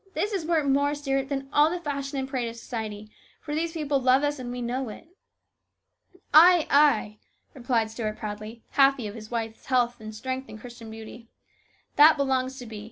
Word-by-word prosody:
This 420 Hz, +1 st, -1 dB
is 350 Hz, -5 st, -2 dB
worth 325 Hz, -3 st, +2 dB
more, 285 Hz, +1 st, +2 dB
Stuart, 275 Hz, -2 st, -2 dB
than 270 Hz, -1 st, -3 dB
all 295 Hz, +1 st, +5 dB
the 355 Hz, +2 st, -3 dB
fashion 280 Hz, -3 st, -4 dB
and 265 Hz, 0 st, -2 dB
parade 255 Hz, -3 st, -2 dB
of 230 Hz, -, -9 dB
society; 215 Hz, -3 st, -6 dB, 0.3 s
for 295 Hz, -, -6 dB
these 325 Hz, +2 st, -1 dB
people 295 Hz, -4 st, 0 dB
love 260 Hz, +2 st, +4 dB
us 290 Hz, -1 st, -1 dB
and 245 Hz, -1 st, -6 dB
we 245 Hz, -, -5 dB
know 245 Hz, +1 st, -3 dB
it." 215 Hz, -, -11 dB, 1.3 s
"Ay, 340 Hz, +1 st, +8 dB
ay," 275 Hz, -8 st, +3 dB, 0.3 s
replied 235 Hz, -4 st, -1 dB
Stuart 220 Hz, -2 st, -4 dB
proudly, 215 Hz, +2 st, -7 dB
happy 275 Hz, -3 st, +3 dB
of 205 Hz, -, -5 dB
his 215 Hz, -1 st, -10 dB
wife's 225 Hz, -2 st, -5 dB
health 245 Hz, -2 st, +1 dB
and 215 Hz, 0 st, -8 dB
strength 260 Hz, +4 st, -5 dB
and 215 Hz, -, -10 dB
Christian 235 Hz, -1 st, -11 dB
beauty. 225 Hz, +1 st, -10 dB, 0.2 s
" -, -, -38 dB
' -, -, -39 dB
That 305 Hz, +2 st, +8 dB
belongs 265 Hz, -1 st, 0 dB
to 245 Hz, -, -8 dB
be.' 220 Hz, -2 st, -8 dB
260 Hz, 200 wpm, -26 LUFS, 225-285 Hz, 1.3 s, Ay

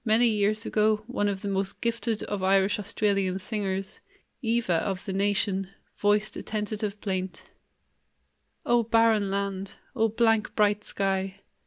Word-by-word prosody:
Many 230 Hz, +1 st, +4 dB
years 215 Hz, +1 st, +1 dB
ago 215 Hz, 0 st, +2 dB
one 215 Hz, -3 st, -1 dB
of 195 Hz, -1 st, -2 dB
the -, -, -2 dB
most 195 Hz, 0 st, -1 dB
gifted 230 Hz, -1 st, -1 dB
of 205 Hz, -2 st, -3 dB
Irish 195 Hz, +2 st, +3 dB
Australian 200 Hz, -2 st, 0 dB
singers, 195 Hz, -1 st, -3 dB, 0.4 s
"Eva"' 225 Hz, -8 st, +1 dB
of 190 Hz, -2 st, -3 dB
the 195 Hz, -, -3 dB
Nation, 195 Hz, -1 st, +1 dB, 0.3 s
voiced 210 Hz, +1 st, +1 dB
a -, -, -5 dB
tentative 210 Hz, -1 st, -3 dB
plaint: 185 Hz, -2 st, -3 dB, 1.2 s
"O 240 Hz, 0 st, +4 dB
barren 225 Hz, -2 st, +3 dB
land! 195 Hz, 0 st, -3 dB, 0.2 s
O 225 Hz, -2 st, +3 dB
blank, 225 Hz, -1 st, +2 dB
bright 210 Hz, -1 st, +2 dB
sky! 195 Hz, 0 st, -2 dB
205 Hz, 140 wpm, -27 LUFS, 195-220 Hz, 1.2 s, Many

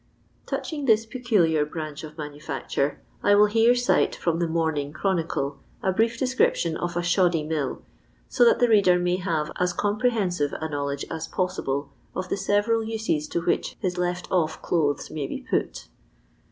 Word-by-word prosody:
Touching 295 Hz, -3 st, -3 dB
this 225 Hz, -2 st, +4 dB
peculiar 210 Hz, -, +2 dB
branch 155 Hz, 0 st, -6 dB
of 155 Hz, 0 st, -9 dB
manufacture, 145 Hz, -2 st, -3 dB, 0.2 s
I 205 Hz, -, +5 dB
will 210 Hz, +1 st, +7 dB
here 225 Hz, +3 st, +4 dB
cite 245 Hz, 0 st, +2 dB
from 170 Hz, -1 st, -1 dB
the 170 Hz, -, +1 dB
Morning 160 Hz, -3 st, -1 dB
Chronki'e 160 Hz, -6 st, -1 dB, 0.2 s
a 190 Hz, -, +2 dB
brief 225 Hz, +4 st, +1 dB
description 250 Hz, -10 st, +1 dB
of 175 Hz, +1 st, -3 dB
a 175 Hz, -, 0 dB
Shoddy 175 Hz, -2 st, +2 dB
Mill, 150 Hz, -3 st, -3 dB, 0.4 s
so -, -, +3 dB
that 235 Hz, -, +6 dB
the 245 Hz, -, +4 dB
reader 200 Hz, -5 st, +5 dB
may 180 Hz, 0 st, +1 dB
have 165 Hz, -5 st, -1 dB
as 180 Hz, 0 st, +1 dB
comprehensive 205 Hz, -, 0 dB
a 160 Hz, -, -2 dB
knowledge 140 Hz, -2 st, -3 dB
as 160 Hz, -1 st, -4 dB
pouible 140 Hz, -6 st, -2 dB, 0.3 s
of 185 Hz, 0 st, -3 dB
the -, -, -1 dB
several 205 Hz, +3 st, +1 dB
uses 220 Hz, -9 st, -1 dB
to 170 Hz, -, -2 dB
which -, -, -1 dB
his 180 Hz, -1 st, -2 dB
left 180 Hz, 0 st, -1 dB
ofT 165 Hz, -4 st, +1 dB
clothes 150 Hz, -4 st, 0 dB
may 145 Hz, -3 st, -3 dB
be -, -, -5 dB
put. -, -, -2 dB
175 Hz, 165 wpm, -25 LUFS, 155-205 Hz, 0.4 s, will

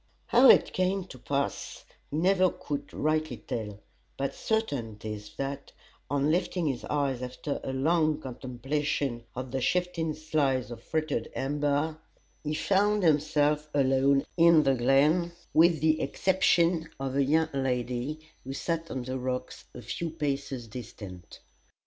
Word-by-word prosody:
How 250 Hz, +2 st, +6 dB
it -, -, +6 dB
came 185 Hz, +1 st, +1 dB
to 130 Hz, -, -11 dB
pass 140 Hz, +3 st, -3 dB, 0.2 s
he 150 Hz, -, -3 dB
never 185 Hz, +2 st, +4 dB
could 155 Hz, -6 st, -5 dB
rightly 155 Hz, -4 st, 0 dB
tell, 105 Hz, -1 st, -5 dB, 0.4 s
but 135 Hz, 0 st, -2 dB
certain 140 Hz, -, -2 dB
it 105 Hz, -, -15 dB
is 105 Hz, -1 st, -6 dB
that, 140 Hz, 0 st, -4 dB, 0.4 s
on 145 Hz, +1 st, +1 dB
lifting 175 Hz, 0 st, 0 dB
his 135 Hz, -5 st, -1 dB
eyes 140 Hz, -4 st, -1 dB
after 125 Hz, +3 st, -4 dB
a -, -, -3 dB
long 155 Hz, +3 st, +2 dB
contemplation 130 Hz, -1 st, -3 dB
of 130 Hz, 0 st, -5 dB
the 135 Hz, 0 st, -2 dB
shifting 170 Hz, -1 st, 0 dB
slides 140 Hz, -6 st, 0 dB
of 115 Hz, -1 st, -8 dB
fretted 155 Hz, -5 st, -2 dB
amber, 145 Hz, +3 st, 0 dB, 0.4 s
he 155 Hz, 0 st, -2 dB
found 205 Hz, +3 st, +2 dB
himself 150 Hz, -1 st, +2 dB
alone 135 Hz, 0 st, +3 dB
in 165 Hz, -2 st, +6 dB
the 135 Hz, -, +3 dB
glen 145 Hz, +8 st, +3 dB, 0.2 s
with 165 Hz, -1 st, +5 dB
the 155 Hz, 0 st, +3 dB
exception 170 Hz, -3 st, +2 dB
of 135 Hz, -1 st, -3 dB
a 140 Hz, -, +3 dB
young 160 Hz, +3 st, +2 dB
lady 130 Hz, +3 st, -2 dB, 0.2 s
who 135 Hz, -, -5 dB
sat 165 Hz, +3 st, -2 dB
on 130 Hz, -, -4 dB
the 130 Hz, +1 st, -4 dB
rocks 125 Hz, 0 st, -4 dB
a 120 Hz, -, -8 dB
few 125 Hz, +9 st, -3 dB
paces 140 Hz, -5 st, -3 dB
distant. 100 Hz, -6 st, -10 dB
145 Hz, 145 wpm, -28 LUFS, 130-160 Hz, 0.4 s, How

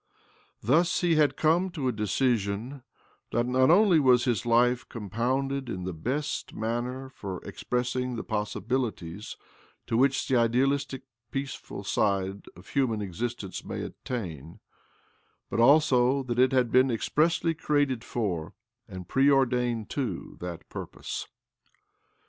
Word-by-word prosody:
Thus 165 Hz, -, +3 dB
he 175 Hz, -2 st, +3 dB
had 155 Hz, -2 st, +3 dB
come 170 Hz, +4 st, +3 dB
to 145 Hz, -7 st, -2 dB
a -, -, +2 dB
decision 110 Hz, +2 st, -1 dB, 0.5 s
that 120 Hz, +1 st, +1 dB
not 130 Hz, +2 st, +3 dB
only 180 Hz, -1 st, +6 dB
was 125 Hz, -3 st, +4 dB
his 120 Hz, -6 st, +1 dB
OBLOMOV 120 Hz, -, -5 dB
279 120 Hz, +1 st, +5 dB
life 125 Hz, +1 st, -7 dB
compounded 130 Hz, +5 st, -2 dB
in 90 Hz, -5 st, -4 dB
the 90 Hz, 0 st, -3 dB
best 130 Hz, -, -3 dB
талпег 125 Hz, +4 st, -3 dB
for 100 Hz, -7 st, -6 dB
ex -, -, -8 dB
pressing 125 Hz, 0 st, -1 dB
the 115 Hz, -, -4 dB
possibilities 105 Hz, -3 st, -3 dB, 0.5 s
to -, -, -2 dB
which 135 Hz, +2 st, +2 dB
the 130 Hz, -, +2 dB
idealistic 130 Hz, +3 st, +1 dB, 0.3 s
peaceful 135 Hz, +1 st, -5 dB
side 100 Hz, 0 st, 0 dB
of 90 Hz, +3 st, -15 dB
human 115 Hz, -7 st, 0 dB
existence 105 Hz, +1 st, -4 dB
may -, -, -5 dB
attain, 85 Hz, -, -6 dB, 0.9 s
but -, -, -1 dB
also 135 Hz, 0 st, +5 dB
that 120 Hz, -1 st, -2 dB
it 130 Hz, +1 st, +5 dB
had 125 Hz, -3 st, +2 dB
been 130 Hz, +1 st, +5 dB
expressly 165 Hz, +8 st, +1 dB
created 145 Hz, -6 st, 0 dB
for, 90 Hz, -11 st, -3 dB, 0.3 s
and 95 Hz, -4 st, -8 dB
preordained 125 Hz, -4 st, +2 dB
to, 120 Hz, -11 st, -3 dB
that 85 Hz, -1 st, -7 dB
purpose -, -, -6 dB
125 Hz, 135 wpm, -28 LUFS, 110-135 Hz, 0.9 s, only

